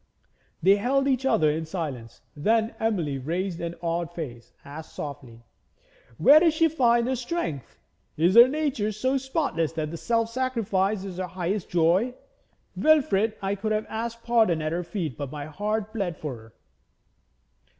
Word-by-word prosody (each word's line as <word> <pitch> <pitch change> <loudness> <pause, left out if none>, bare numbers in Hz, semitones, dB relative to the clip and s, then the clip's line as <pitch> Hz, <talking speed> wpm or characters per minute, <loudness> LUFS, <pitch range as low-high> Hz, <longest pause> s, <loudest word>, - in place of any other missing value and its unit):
They 195 +3 +6
held 275 +6 +1
each 265 -1 +1
other 175 - +3
in 160 +1 -3
silence. 140 -10 -6
Then 220 +8 +1
Emily, 170 -11 -1
raising 170 +5 -3
an 170 0 -4
awed 170 0 -2
face, 120 -8 -7
asked 155 +3 -10
softly: 130 -5 -8 0.7
'Where 285 - +7
does 325 -1 +3
she 325 +1 +4
find 240 -6 +3
her 260 +1 0
strength? 240 - -4 0.4
Is 170 +4 +3
her 235 +3 +9
nature 265 -7 -1
so 260 +6 0
spotless 265 - -1
that 155 0 -3
self 230 +2 0
sacrifice 215 -6 0
is 190 -3 -7
her 185 0 -3
highest 185 +2 -3
joy? 180 +9 +2 0.6
Wilfrid, 225 -9 +3
I 195 +1 0
could 215 +2 -2
have 215 0 -1
asked 230 +1 -5
pardon 225 -8 +3
at 155 0 -2
her 175 +2 -2
feet; 165 - -4
my 145 +1 -5
heart 210 +6 -3
bled 190 -8 -2
for 150 -5 -5
her.' 110 -1 -15
195 Hz, 155 wpm, -26 LUFS, 160-235 Hz, 0.7 s, her